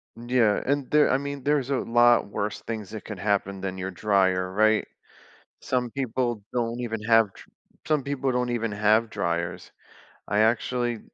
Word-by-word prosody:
Yeah, 120 Hz, -3 st, +1 dB
and 140 Hz, 0 st, -1 dB
there 150 Hz, 0 st, +4 dB
I 130 Hz, -, +3 dB
mean, 140 Hz, -1 st, -5 dB
there's 140 Hz, -2 st, +1 dB
a 140 Hz, -, +1 dB
lot 120 Hz, 0 st, +4 dB
worse 100 Hz, 0 st, -4 dB
things 110 Hz, -4 st, -6 dB
that 110 Hz, -1 st, -8 dB
could 105 Hz, -4 st, -7 dB
happen 100 Hz, -1 st, -1 dB
than 95 Hz, -1 st, -4 dB
your 95 Hz, +1 st, -4 dB
dryer, 95 Hz, -1 st, +1 dB
right? 110 Hz, +2 st, +2 dB, 0.7 s
Some 125 Hz, -2 st, -1 dB
people 120 Hz, -3 st, -2 dB
don't 120 Hz, 0 st, -2 dB
even 115 Hz, -3 st, -4 dB
have 115 Hz, 0 st, +5 dB
dr 100 Hz, -, -16 dB, 0.4 s
some 155 Hz, -2 st, +2 dB
people 135 Hz, -1 st, -2 dB
don't 125 Hz, 0 st, 0 dB
even 115 Hz, -3 st, -2 dB
have 105 Hz, +2 st, +2 dB
dryers. 85 Hz, 0 st, -3 dB, 0.6 s
I 105 Hz, -, +1 dB
actually, 120 Hz, +1 st, +1 dB
115 Hz, 165 wpm, -25 LUFS, 105-125 Hz, 0.7 s, have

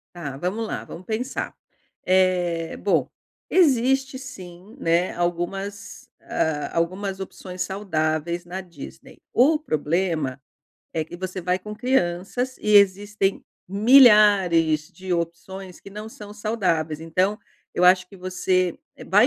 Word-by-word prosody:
Tá 145 Hz, -6 st, -6 dB
vamos 195 Hz, +9 st, -2 dB
lá, -, -, -4 dB
vamos 180 Hz, +2 st, -10 dB
pensar, 235 Hz, +6 st, -3 dB, 0.5 s
eh, 180 Hz, -3 st, +2 dB
bom, 165 Hz, -10 st, +1 dB, 0.4 s
existe 270 Hz, -5 st, +3 dB
sim, 185 Hz, -6 st, -11 dB
né, 170 Hz, +2 st, +1 dB
algumas, 175 Hz, +4 st, -4 dB
ah, 150 Hz, -2 st, -1 dB
algumas 190 Hz, +3 st, -1 dB
opções 185 Hz, -1 st, -7 dB
saudáveis 170 Hz, -3 st, -1 dB
na 180 Hz, +2 st, -5 dB
Disney. 170 Hz, -6 st, -12 dB
O 290 Hz, +6 st, +5 dB
problema, 155 Hz, -, -1 dB, 0.5 s
é 160 Hz, -2 st, -1 dB
que 165 Hz, -, -10 dB
você 185 Hz, +1 st, -5 dB
vai 180 Hz, +1 st, +1 dB
com 210 Hz, +3 st, -8 dB
crianças 245 Hz, +2 st, 0 dB
e 210 Hz, -, +1 dB
existem 200 Hz, 0 st, +2 dB, 0.2 s
milhares 200 Hz, -, +5 dB
de 185 Hz, -1 st, -6 dB
opções 175 Hz, +2 st, -4 dB
que 200 Hz, -, -13 dB
não 210 Hz, +2 st, -7 dB
são 210 Hz, -2 st, -11 dB
saudáveis 185 Hz, -8 st, -1 dB
então, 185 Hz, +6 st, 0 dB, 0.4 s
eu 180 Hz, -, +2 dB
acho 185 Hz, 0 st, +5 dB
que 195 Hz, -, -14 dB
você 185 Hz, -1 st, 0 dB, 0.3 s
vai 205 Hz, +5 st, +5 dB
185 Hz, 125 wpm, -24 LUFS, 170-210 Hz, 0.5 s, O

